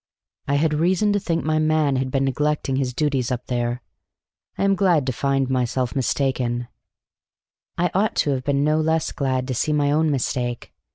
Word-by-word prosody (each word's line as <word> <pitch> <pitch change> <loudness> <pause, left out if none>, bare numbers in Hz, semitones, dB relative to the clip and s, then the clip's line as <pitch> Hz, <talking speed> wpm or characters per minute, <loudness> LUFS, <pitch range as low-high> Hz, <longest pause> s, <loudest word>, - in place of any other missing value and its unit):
"I 140 - +1
had 155 +2 +2
reason 185 +7 +2
to 205 - +1
think 170 -4 -2
my 155 0 +1
man 155 -3 +2
had 130 0 -1
been 135 +1 0
neglecting 145 0 0
his 130 -2 -1
duties 135 -2 -1
up 125 -1 -3
there. 120 0 -2 0.7
I - - -1
am 195 0 +3
glad 180 -7 +2
to 130 - -1
find 135 +1 0
myself 125 0 -1
mistaken." 125 -2 -1 1.1
I 175 +1 +1
ought 205 +3 +1
to 145 - +1
have 130 -2 -2
been 140 +1 +1
no 155 +1 +2
less 160 0 0
glad 130 -2 -1
to - - 0
see 150 +5 0
my 145 -1 +2
own 155 +1 +2
mistake. 125 -3 -2
140 Hz, 185 wpm, -22 LUFS, 130-155 Hz, 1.1 s, am